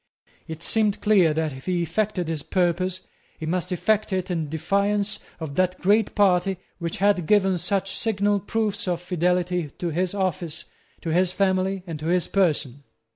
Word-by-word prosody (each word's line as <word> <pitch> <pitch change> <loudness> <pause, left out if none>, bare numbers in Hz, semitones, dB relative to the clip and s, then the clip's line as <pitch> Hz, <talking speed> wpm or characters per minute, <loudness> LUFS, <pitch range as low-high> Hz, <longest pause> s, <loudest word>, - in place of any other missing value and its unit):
It 160 0 -6
seemed 215 -2 +1
clear 195 -6 +4
that, 155 -1 -1
if 130 +4 -11
he 180 -2 +1
effected 180 +1 -1
his 160 -2 -2
purpose, 185 +2 0 0.4
he 160 - -6
must 180 +3 -1
effect 215 +4 +1
it 185 0 -1
in 160 -4 -2
defiance 200 +6 0 0.2
of 160 -4 -5
that 185 0 +1
great 205 +3 +2
party 190 -1 +3 0.2
which 170 -2 -3
had 195 -4 +2
given 195 -3 +3
such 195 +2 -1
signal 205 -2 +1
proofs 210 0 -2
of 175 -2 0
fidelity 180 -1 0
to 175 +5 -4
his 180 +4 -1
office, 175 -4 -2 0.4
to 165 - -4
his 180 +1 +3
family, 190 0 0
and 165 -4 -6
to 155 - -4
his 180 0 +2
person. 145 -8 0
180 Hz, 170 wpm, -24 LUFS, 170-195 Hz, 0.4 s, clear